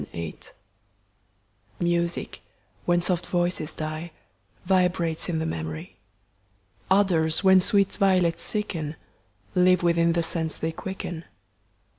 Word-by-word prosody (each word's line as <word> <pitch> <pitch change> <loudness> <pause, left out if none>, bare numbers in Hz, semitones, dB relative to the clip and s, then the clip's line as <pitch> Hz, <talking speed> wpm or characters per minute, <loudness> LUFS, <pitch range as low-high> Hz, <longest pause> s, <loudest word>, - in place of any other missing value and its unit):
SHAKESPE 85 -1 -7 1.3
TO - - 0
Mrsir, 170 0 -1 0.5
when 175 0 +2
soft 175 -1 0
voices 175 -3 -1
die, 155 +2 -5 0.5
Vibrates 180 -3 +1
in 165 - -1
the 160 - -1
memory, 80 - -5 0.5
— 100 0 -37
OdorS, 180 -4 +3
Wild! 190 -1 +6
sweet 200 +1 +3
Violets 185 -4 +2
sicl 165 -8 -3 0.6
Live 180 -1 +4
within 170 -1 +3
the 170 0 +1
sense 160 -1 0
they 160 - -2
quicken. 175 -1 -6
170 Hz, 115 wpm, -25 LUFS, 160-180 Hz, 1.3 s, Wild